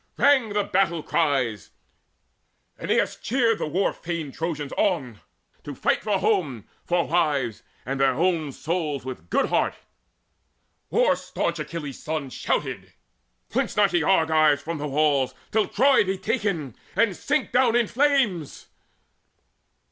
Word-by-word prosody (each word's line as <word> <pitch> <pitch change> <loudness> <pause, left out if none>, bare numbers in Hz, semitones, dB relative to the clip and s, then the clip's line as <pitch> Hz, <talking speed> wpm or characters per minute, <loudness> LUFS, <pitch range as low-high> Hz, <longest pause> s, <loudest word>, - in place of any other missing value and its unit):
Rang 275 -5 +4
the 205 0 0
battle 180 -5 0
cries: 125 - 0 1.1
Aeneas - - 0
cheered 230 -3 +1
the - - -2
war 185 +6 0
fain 165 -4 -5
Trojans 150 -2 -4
on 135 - -1 0.4
To 145 - -7
fight - - +1
for 210 -2 0
home, 180 - 0 0.2
for 175 -1 +1
wives, 145 -9 0 0.2
and 135 +2 -3
their 135 -1 +3
own 165 -2 0
souls 150 -3 -3
With 130 -1 -5
a - - -26
good 85 - 0
heart: - - +1 1.1
war - - +3
staunch - - -3
Achilles' 150 -5 -6
son 155 -4 -4
Shouted: - - -3 0.5
"Flinch - - -2
not, 205 -2 +4
ye 175 - +3
Argives, 155 -4 +3
from 165 -1 -4
the 150 - -3
walls, 140 -2 +1 0.2
Till 220 -1 +2
Troy 270 -1 +4
be 190 -1 -2
taken, 170 - -2 0.2
and 225 -5 +2
sink 300 - -1
down 245 -2 +3
in 240 -1 +4
flames!" 250 - 0
165 Hz, 140 wpm, -24 LUFS, 145-205 Hz, 1.1 s, Rang